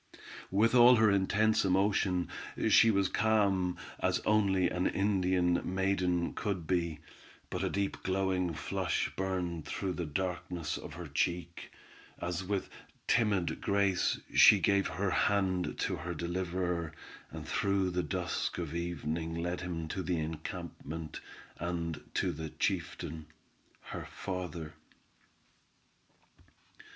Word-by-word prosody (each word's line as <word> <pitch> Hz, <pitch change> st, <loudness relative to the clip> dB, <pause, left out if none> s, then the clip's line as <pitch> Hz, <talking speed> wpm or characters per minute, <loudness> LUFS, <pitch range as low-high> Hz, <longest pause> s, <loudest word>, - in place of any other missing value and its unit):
With 110 Hz, +5 st, +3 dB
all 125 Hz, 0 st, +8 dB
her 110 Hz, -2 st, +5 dB
intense 105 Hz, +3 st, +3 dB
emotion, 95 Hz, -1 st, +2 dB, 0.4 s
she 115 Hz, -, +7 dB
was 100 Hz, -3 st, +3 dB
calm, 100 Hz, -5 st, +2 dB, 0.2 s
as -, -, +1 dB
only 100 Hz, -4 st, +3 dB
an 90 Hz, 0 st, 0 dB
Indian 90 Hz, -3 st, +2 dB
maiden 90 Hz, -2 st, 0 dB
could 95 Hz, -5 st, -3 dB
be, 85 Hz, -3 st, -1 dB, 0.5 s
but -, -, -2 dB
a -, -, +1 dB
deep 100 Hz, -1 st, -2 dB
glowing 95 Hz, -2 st, 0 dB
flush -, -, -1 dB
burned 90 Hz, -4 st, -2 dB
through 95 Hz, +4 st, -2 dB
the 85 Hz, -2 st, -3 dB
darkness 90 Hz, 0 st, -3 dB
of -, -, -8 dB
her 90 Hz, +1 st, -6 dB
cheek, 85 Hz, +3 st, -2 dB, 0.5 s
as 85 Hz, +1 st, -2 dB
with 95 Hz, +1 st, -2 dB, 0.4 s
timid 100 Hz, -7 st, +2 dB
grace, 100 Hz, -2 st, +2 dB
she -, -, +9 dB
gave 100 Hz, 0 st, +3 dB
her 95 Hz, +3 st, -1 dB
hand 95 Hz, -2 st, +1 dB
to -, -, -1 dB
her 85 Hz, 0 st, -5 dB
deliverer, 85 Hz, -1 st, -2 dB, 0.4 s
and -, -, -8 dB
through 100 Hz, -2 st, +1 dB
the 90 Hz, 0 st, 0 dB
dusk 75 Hz, -5 st, -2 dB
of 85 Hz, -3 st, -4 dB
evening 80 Hz, -1 st, -3 dB
led 85 Hz, +1 st, -2 dB
him 85 Hz, -3 st, -4 dB
to 95 Hz, -, -2 dB
the 90 Hz, -2 st, -1 dB
encampment, 80 Hz, -1 st, -5 dB, 0.4 s
and 85 Hz, -2 st, -3 dB
to -, -, +1 dB
the 80 Hz, +1 st, -5 dB
chieftain, 80 Hz, +1 st, -3 dB, 0.5 s
her -, -, -7 dB
father. 90 Hz, -4 st, -5 dB
90 Hz, 120 wpm, -32 LUFS, 85-95 Hz, 0.5 s, she